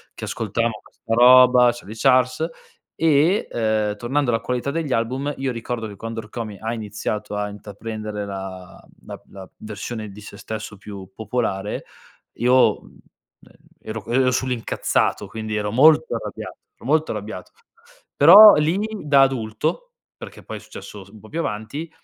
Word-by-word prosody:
che -, -, -10 dB
ascoltavamo 115 Hz, +1 st, -2 dB
questa 115 Hz, -, -7 dB
roba, 125 Hz, +1 st, +7 dB
Charlie 115 Hz, -2 st, -10 dB
Charles, 130 Hz, +5 st, +2 dB, 0.5 s
e, 160 Hz, +5 st, +2 dB
uhm, 110 Hz, -2 st, 0 dB
tornando 120 Hz, +4 st, -1 dB
alla 115 Hz, -, +1 dB
qualità 125 Hz, +2 st, -2 dB
degli 160 Hz, -3 st, -3 dB
album, 130 Hz, +5 st, -1 dB
io 135 Hz, -1 st, -2 dB
ricordo 115 Hz, -1 st, -4 dB
che 100 Hz, -, -10 dB
quando 115 Hz, 0 st, -6 dB
Rkomi 105 Hz, -1 st, -7 dB
ha 115 Hz, +1 st, -3 dB
iniziato 105 Hz, -1 st, -4 dB
a 105 Hz, 0 st, -2 dB
intraprendere 105 Hz, 0 st, -6 dB
la 95 Hz, -2 st, -8 dB
mhmm, -, -, -26 dB
la -, -, -9 dB
la 95 Hz, -2 st, -11 dB
versione 110 Hz, +1 st, -6 dB
di 100 Hz, +2 st, -12 dB
sé -, -, -11 dB
stesso 110 Hz, -1 st, -7 dB
più 95 Hz, -1 st, -10 dB
popolare, 105 Hz, -2 st, -3 dB, 0.5 s
io, 125 Hz, +2 st, +3 dB
mhmm, -, -, -19 dB, 0.8 s
e -, -, -12 dB
ero 110 Hz, 0 st, -5 dB
ero 130 Hz, +1 st, +2 dB
sull'incazzato, 125 Hz, -2 st, -1 dB
quindi 110 Hz, -1 st, -5 dB
ero 105 Hz, -1 st, -2 dB
molto 155 Hz, +4 st, +5 dB
arrabbiato, 115 Hz, -, -7 dB, 0.2 s
ero -, -, -17 dB
molto 155 Hz, +3 st, +1 dB
arrabbiato. 105 Hz, +1 st, -7 dB, 0.7 s
Però 200 Hz, +8 st, +10 dB
lì 155 Hz, +4 st, +1 dB, 0.3 s
da 140 Hz, -2 st, +5 dB
adulto, 135 Hz, -, -1 dB, 0.2 s
perché -, -, -11 dB
poi -, -, -7 dB
è -, -, -9 dB
successo 100 Hz, -2 st, -11 dB
s -, -, -19 dB
un 110 Hz, 0 st, -15 dB
po' 110 Hz, -, -15 dB
più 165 Hz, -, -4 dB
avanti, 140 Hz, +5 st, -4 dB
115 Hz, 160 wpm, -22 LUFS, 105-130 Hz, 0.8 s, Però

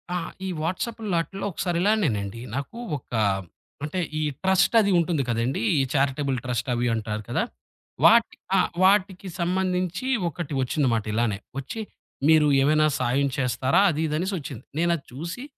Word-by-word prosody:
ఆహ్, 175 Hz, -, -3 dB
ఈ -, -, -2 dB
వాట్సాప్‌ల్లో 200 Hz, +4 st, -2 dB
ఆటిల్లో 195 Hz, +4 st, -6 dB
ఒకసారిలానేనండి. 170 Hz, -, 0 dB
నాకు 140 Hz, -, -5 dB, 0.2 s
ఒక 125 Hz, -, -16 dB, 0.7 s
అంటే 155 Hz, +5 st, -2 dB, 0.2 s
ఈ -, -, -1 dB, 0.2 s
ట్రస్ట్ 190 Hz, +4 st, +3 dB
అది 200 Hz, -, +1 dB
ఉంటుంది 165 Hz, -4 st, +1 dB
కదండీ. 115 Hz, +1 st, 0 dB, 0.2 s
ఈ -, -, +4 dB
చారిటబుల్ 135 Hz, -1 st, +1 dB
ట్రస్ట్ 125 Hz, +1 st, -2 dB
అవి 120 Hz, 0 st, 0 dB
అంటారు 110 Hz, -1 st, -3 dB
కదా! 125 Hz, -, +1 dB, 0.6 s
వాట 230 Hz, 0 st, +7 dB, 0.3 s
ఆ! -, -, +5 dB, 0.2 s
వాటికి 190 Hz, -1 st, +3 dB
సంబంధించి 185 Hz, +4 st, -1 dB, 0.2 s
ఒకటి 160 Hz, -2 st, -6 dB
ఒచ్చింది 135 Hz, +1 st, +1 dB
మాట 110 Hz, -2 st, -1 dB
ఇలానే. 110 Hz, -3 st, +1 dB, 0.2 s
ఒచ్చి 145 Hz, -, -6 dB, 0.5 s
మీరు 155 Hz, -1 st, +6 dB
ఏమైనా 155 Hz, +2 st, +4 dB
సాయం 140 Hz, +3 st, +1 dB
చేస్తారా? 130 Hz, +5 st, +2 dB
అదీదనేసొచ్చింది. 155 Hz, -, -2 dB, 0.2 s
నేను 170 Hz, +1 st, +2 dB
అది 140 Hz, -, -16 dB
చూసి 170 Hz, -, -6 dB
155 Hz, 140 wpm, -25 LUFS, 130-185 Hz, 0.7 s, వాట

